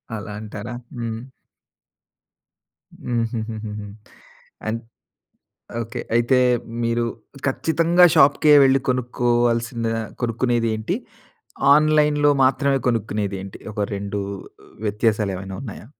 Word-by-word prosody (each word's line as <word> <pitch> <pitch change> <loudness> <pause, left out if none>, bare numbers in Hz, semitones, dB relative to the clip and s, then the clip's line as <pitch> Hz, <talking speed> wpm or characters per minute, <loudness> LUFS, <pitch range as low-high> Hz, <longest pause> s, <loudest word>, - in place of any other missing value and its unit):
అలా 105 -1 -6
అంటారా. 110 +2 -7 0.2
హ్మ్. 115 -1 -4 1.8
హుహుహుహు. 110 -3 -3 0.8
అన్ 110 +1 -1 1.0
ఓకే. 120 +2 -5
అయితే 120 +2 +3 0.4
మీరు 115 0 +1 0.4
ఖచ్చితంగా 165 +5 +3
షాప్‌కే 145 +2 +6
వెళ్లి 135 0 +4
కొనుక్కోవాల్సిన 120 -1 0 0.4
కొనుక్కునేదేంటి? 115 -2 0 0.8
ఆన్‌లైన్‌లో 150 -1 +4
మాత్రమే 135 +1 +2
కొనుక్కునేదేంటి? 100 -4 -2
ఒక 105 - -6 0.2
2 100 +1 -4 0.7
వ్యత్యాసాలేవైనా 105 -3 -1
ఉన్నాయా? 110 -5 -8
115 Hz, 75 wpm, -22 LUFS, 110-130 Hz, 1.8 s, షాప్‌కే